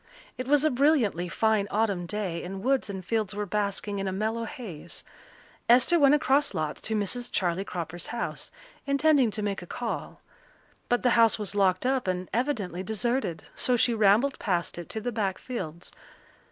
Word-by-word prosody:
It 255 - -5
was 290 +1 +4
a 310 - +3
brilliantly 245 - +2
fine 215 +2 +1
autumn 200 -5 0
day, 180 -3 -3
and 190 +2 -6
woods 265 -3 +1
and 190 -2 -6
fields 215 -1 -1
were 210 0 -2
basking 200 0 -2
in 195 - -2
a - - -1
mellow 220 +4 -2
haze. 210 - -8 0.7
Esther 255 +8 +6
went 285 0 +6
across 290 -1 +2
lots 155 -1 -3
to 220 - -1
Mrs. 215 +4 -2
Charley 180 -1 0
Cropper's 175 -2 -5
house, 235 - -4 0.4
intending 280 -3 +4
to 215 0 -3
make 200 -2 -2
a 175 - -10
call. 240 +4 -5 0.7
But 245 - +1
the 250 - +4
house 230 -1 +5
was 210 -3 -4
locked 190 0 +2
up 260 -4 +1
and 185 0 -2
evidently 220 - -1
deserted, 220 -1 -2
so 250 - +1
she 240 +1 +3
rambled 220 +5 +3
past 175 -3 -1
it 175 - -8
to 220 - -4
the 245 - -2
back 205 -4 -1
fields. 180 -9 -6
215 Hz, 180 wpm, -27 LUFS, 185-245 Hz, 0.7 s, Esther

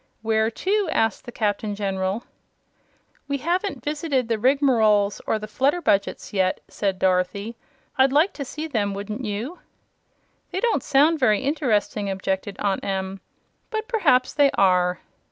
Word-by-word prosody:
"Where 220 0 +2
to?" 390 - 0
asked 225 0 0
the 240 - -7
Captain 210 -2 -1
General. 195 +2 -2 1.0
"We 280 0 -1
haven't 355 +8 -2
visited 290 -4 -1
the 225 -2 0
Rigmaroles 225 -6 +3
or 220 - +1
the 215 - -6
Flutterbudgets 265 - 0
yet," 185 -2 +1
said 195 -2 -2
Dorothy. 190 +4 0 0.4
"I'd 265 0 +5
like 310 +8 +3
to 285 - -5
see 305 +4 -6
them 205 -8 -1
wouldn't 210 +5 -5
you?" 225 - -4 0.9
"They 375 - -3
don't 470 +2 +1
sound 300 +3 +3
very 215 -6 +3
interesting," 235 -8 0
objected 190 +1 -2
Aunt 200 -2 -1
Em. 190 0 -3 0.5
"But 440 -1 -3
perhaps 290 - +2
they 285 -2 +4
are." 180 -2 +3
225 Hz, 140 wpm, -23 LUFS, 200-285 Hz, 1.0 s, I'd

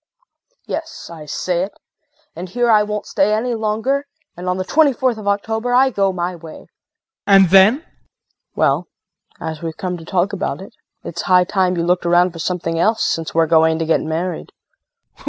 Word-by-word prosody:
Yes, 325 - -6
I 155 -2 -11
say 175 +4 -2
it 195 +2 -4 0.6
and 180 +3 -7
here 240 +4 +1
I 215 -1 +5
won't 210 0 -3
stay 205 +2 +1
any 240 +3 -1
longer 225 +6 -1 0.3
and 180 +1 -5
on 180 - -1
the 185 - -2
twenty 290 +7 +3
fourth 250 -2 -1
of 205 - -8
October 220 +4 -1
I 260 +1 +4
go 195 -3 +1
my 180 0 -3
way. 165 -2 -11
JEAN. - - -20 0.6
And 195 -3 +6
then? 195 +5 +7
KRISTIN. - - -34 0.6
Well, - - +1 0.5
as 160 -1 -6
we've 165 -1 -5
come 180 -1 -3
to 165 - -12
talk 185 +3 0
about 195 - -3
it, 190 - -11 0.3
it's 170 - -5
high 180 -1 +4
time 185 -1 0
you 170 - 0
looked 175 0 0
around 175 +1 +4
for 165 - -11
something 165 -1 -2
else, 220 +5 +2
since 165 -1 -2
we're 165 0 +4
going 160 0 +3
to 165 - -2
get 160 - +2
married. 165 +2 -4
185 Hz, 190 wpm, -19 LUFS, 170-215 Hz, 0.6 s, then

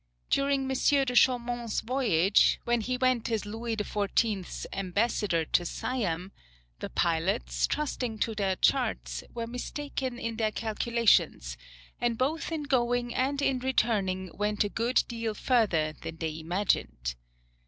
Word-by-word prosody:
During 275 0 +2
M. 265 - -3 0.4
de 250 - -2
Chaumont's 240 -2 +2
voyage, 215 -7 +3
when 240 -1 +2
he 250 +3 -2
went 255 -3 +1
as 220 -2 -1
Louis 225 +2 -3
XIV.'s 205 -1 -1
ambassador 195 -3 0
to 175 - +2
Siam, 185 -3 -2 0.5
the - - -5
pilots, 170 +5 0
trusting 250 -6 -2
to 225 +1 0
their 195 -3 0
charts, - - 0
were 235 -1 -4
mistaken 255 +1 -4
in 230 -2 -4
their 220 -2 +1
calculations, 220 - +1 0.4
and 240 -1 0
both 300 +7 -1
in 315 -2 -2
going 245 -3 +1
and 275 +2 0
in 260 -2 +2
returning 205 -8 0
went 210 +1 0
a 205 - -2
good 235 +4 +1
deal 230 -2 -3
further 195 -12 +2
than 165 +1 -8
they 160 -1 -3
imagined. 160 - -1
225 Hz, 135 wpm, -29 LUFS, 190-245 Hz, 0.5 s, voyage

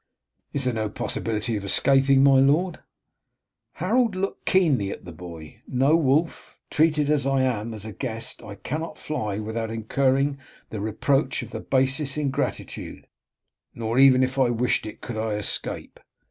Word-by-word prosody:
"Is 140 - +1
there 125 - +1
no 110 -2 -2
possibility 110 +1 -2
of 100 - -4
escaping, 135 +6 +4
my 135 -1 +6
lord?" 155 +6 +2 0.9
Harold 220 +4 +1
looked 195 +1 -4
keenly 150 - +3
at - - -7
the 90 - -8
boy. 80 -2 -11
"No, 135 +5 +3
Wulf, 155 +1 0
treated 150 -2 +2
as 145 -2 +1
I 135 -1 +2
am 115 -3 -1
as 110 -2 -6
a 110 - -6
guest 115 0 -3
I 105 -1 -9
cannot 155 +9 -5
fly 105 -10 -3
without 110 +1 -3
incurring 135 +5 0 0.3
the 105 - -4
reproach 135 +7 0
of - - -10
the - - -5
basest 135 +2 +1
ingratitude, 140 -2 -3 0.7
nor 115 +2 -1
even 130 -1 +7
if 130 +1 -1
I 130 -2 +4
wished 120 -1 0
it 110 - -10
could 120 - -6
I 110 0 -1
escape. 105 - -4
130 Hz, 160 wpm, -24 LUFS, 110-145 Hz, 0.9 s, even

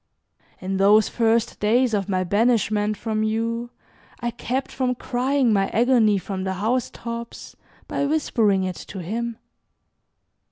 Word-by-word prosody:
In 190 +1 -3
those 205 +2 +5
first 230 0 +1
days 235 +3 +2
of 200 -1 -1
my 185 -1 +1
banishment 210 0 +1
from 220 -1 -2
you 230 +2 -1 0.5
I 240 0 -2
kept 250 +3 -3
from 250 -1 -1
crying 250 0 +1
my 195 -1 +2
agony 230 -3 +3
from 190 0 -4
the 190 0 -2
housetops 235 +2 -4 0.3
by 280 - -1
whispering 225 -10 +1
it 185 -1 -3
to - - -8
him. 230 +5 -3
225 Hz, 130 wpm, -23 LUFS, 205-240 Hz, 0.5 s, those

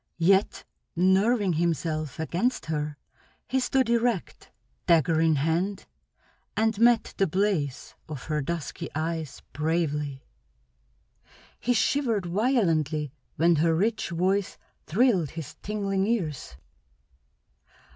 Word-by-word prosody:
Yet, 190 +4 +2 0.3
nerving 190 +3 +3
himself 160 -2 -1
against 180 +10 -1
her, 150 -1 -3 0.5
he 265 - +1
stood 260 0 +1
erect, 235 -4 -1 0.4
dagger 165 -1 +4
in 160 -1 +4
hand, 170 +7 -1 0.7
and 220 -1 +1
met 235 -1 +4
the 195 - +3
blaze 170 -7 -1 0.2
of 150 -4 -6
her 150 -1 -1
dusky 165 +1 -4
eyes 160 -3 -3
bravely. 150 -3 -1 1.4
He 245 - +1
shivered 230 -4 +1
violently 170 - +1 0.2
when 170 +1 +3
her 165 +1 +3
rich 215 +6 0
voice 185 +3 0 0.3
thrilled 190 - +2
his 160 -2 -7
tingling 200 -2 -1
ears. 155 - -2
170 Hz, 105 wpm, -27 LUFS, 155-210 Hz, 1.4 s, dagger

